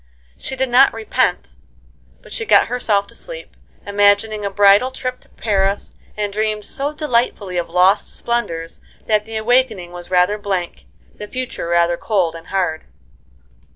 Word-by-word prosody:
She 265 - -4
did 265 0 -1
not 250 0 +5
repent, 225 -1 -1 0.7
but - - -15
she 450 - -2
got - - +4
herself 210 -5 +1
to - - -15
sleep, - - -7 0.3
imagining 205 +1 +2
a 200 - -1
bridal 200 +4 +5
trip 255 -1 -5
to - - -12
Paris, 200 -2 -1 0.2
and 205 -1 -2
dreamed 215 0 -1
so 280 +2 -2
delightfully 235 - -1
of 170 -1 -2
lost 180 +3 +3
splendors 170 -9 -3 0.2
that 215 -1 +1
the 225 0 -5
awakening 220 -6 +1
was 175 0 -10
rather 185 +3 +2
blank, 190 -4 -3 0.3
the 210 - -9
future 255 -7 -5
rather 170 0 +2
cold 185 -6 0
and 165 -1 -11
hard. 175 -5 -1
205 Hz, 155 wpm, -19 LUFS, 185-235 Hz, 0.7 s, not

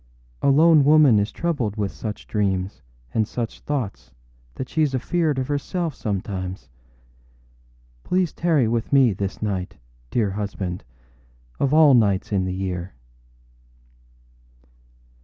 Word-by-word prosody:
A - - +3
lone 155 +1 +6
woman 145 -6 +6
is 100 +2 -1
troubled 140 -12 -2
with 100 -2 -1
such 105 -2 -6
dreams 95 -3 -1 0.3
and 110 -2 +1
such 115 -1 -4
thoughts 100 - -4 0.4
that 130 - -5
sheâs 150 -4 0
afeard 155 +2 0
of 130 -1 -1
herself 155 +3 -2
sometimes. 95 - -4 1.3
Pray 185 - +1
tarry 160 -6 +1
with 115 0 -1
me 135 -6 +5
this 100 +2 -4
night, 95 -4 -3 0.3
dear 105 -5 0
husband, 95 -3 -4 0.8
of 135 - +1
all 155 -2 +6
nights 105 -6 +2
in 95 -2 +1
the 95 0 -3
year. 90 -2 -4
110 Hz, 120 wpm, -23 LUFS, 95-145 Hz, 1.3 s, lone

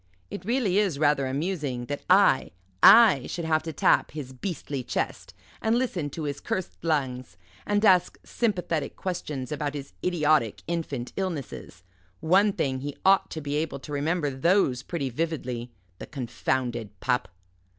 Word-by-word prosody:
It 175 - -7
really 220 -5 +2
is 195 -8 +1
rather 145 -2 +2
amusing 140 -3 -2
that 145 +2 -4
I 185 -7 +5 0.3
I 215 - +8
should 170 - -4
have 155 -1 +2
to 160 +1 -5
tap 150 - +3
his 140 -4 -7
beastly 145 -2 -4
chest, - - -4 0.3
and 225 +2 +2
listen 185 - -1
to 155 +3 -6
his 145 -1 -3
cursed 185 - -4
lungs, 130 - -2 0.3
and 205 +1 +2
ask 185 -3 +4
sympathetic 180 -9 -1
questions 150 -8 -4
about 150 -1 -3
his 140 -1 -7
idiotic 155 - +1
infant 150 -7 -4
illnesses 170 - -5 0.4
one 195 +6 +4
thing, 135 -8 -1
he 145 +1 -6
ought 195 0 +5
to 160 - -5
be 145 0 -4
able 155 -1 -2
to 145 +2 -9
remember 150 +1 0
those 135 -2 +2
pretty 140 -2 -3
vividly 125 -5 -3 0.3
the - - -8
confounded 120 -5 -3
pup." 125 0 0
150 Hz, 150 wpm, -26 LUFS, 130-180 Hz, 0.4 s, I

